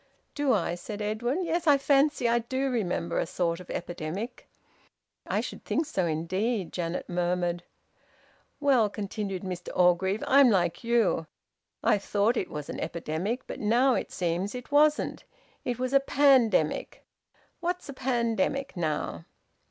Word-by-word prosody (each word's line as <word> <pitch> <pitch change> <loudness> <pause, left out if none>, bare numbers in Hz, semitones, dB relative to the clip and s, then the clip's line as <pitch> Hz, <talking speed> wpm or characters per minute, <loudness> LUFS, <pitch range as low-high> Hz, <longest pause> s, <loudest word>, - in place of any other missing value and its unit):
"Do 290 -3 +1
I?" 170 -6 +1
said 205 +4 -6
Edwin. 240 - -1
"Yes, 335 0 -1
I 290 -2 +7
fancy 275 -1 +3
I 235 +1 +3
do 260 +3 -2
remember 180 -7 -1
a - - -1
sort 170 -1 -1
of 180 - -12
epidemic." 175 +7 -5 0.8
"I - - 0
should - - -7
think 315 - 0
so 190 - -1
indeed!" 185 +6 -1
Janet 170 0 -3
murmured. 175 0 -1 1.0
"Well," 265 -7 +3
continued 200 -2 -4
Mr 180 -2 -5
Orgreave, 185 +3 +3
"I'm 275 -1 +6
like 175 -3 +1
you. 230 -8 +2 0.6
I 205 - +3
thought 205 +4 +1
it 190 - -2
was 150 -1 -6
an - - -5
epidemic. 175 +10 -3
But - - -7
it 240 +4 +2
seems 180 +5 -2
it 250 +3 -8
wasn't. 300 +1 +3 0.4
It 245 -2 -2
was 255 +1 -2
a 275 - +7
pandemic. 260 - +2 0.5
What's 355 0 -3
a 280 - -6
pandemic, 260 +2 -1
now?" 155 - -2
215 Hz, 145 wpm, -28 LUFS, 175-265 Hz, 1.0 s, I